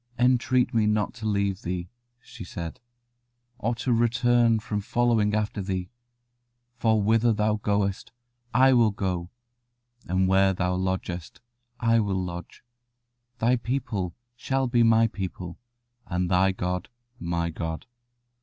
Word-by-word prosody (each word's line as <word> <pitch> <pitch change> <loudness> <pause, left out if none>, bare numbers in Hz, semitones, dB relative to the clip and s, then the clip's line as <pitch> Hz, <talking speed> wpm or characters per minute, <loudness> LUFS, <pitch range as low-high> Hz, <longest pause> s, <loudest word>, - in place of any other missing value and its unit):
"Entreat 125 0 +2
me 110 -2 +3
not 105 -1 +1
to 110 -2 -5
leave 100 -2 0
thee," 90 0 -3 0.3
she 120 -3 -11
said, 85 -2 -6 0.8
"or 115 +1 0
to 120 +2 0
return 120 0 +3
from 105 -2 -3
following 110 -1 +2
after 105 -1 -1
thee: 95 -2 -3 0.8
for 110 -2 +2
whither 115 +2 +3
thou 105 0 +1
goest, 100 -2 -1 0.4
I 130 +3 +5
will 120 -3 +5
go; 90 -4 -3 0.8
and 95 +1 +2
where 95 0 +4
thou 90 0 0
lodgest, 90 -2 -3 0.4
I 115 -1 +3
will 100 -3 0
lodge: 90 -2 -6 0.7
thy 125 +2 +2
people 115 -7 -3 0.2
shall 135 +2 -1
be 120 -1 +2
my 115 0 +5
people, 95 -5 -5 0.5
and 90 0 -1
thy 95 +1 +4
God 90 0 -3 0.3
my 85 -1 -1
God. 80 0 -5
105 Hz, 130 wpm, -26 LUFS, 90-115 Hz, 0.8 s, I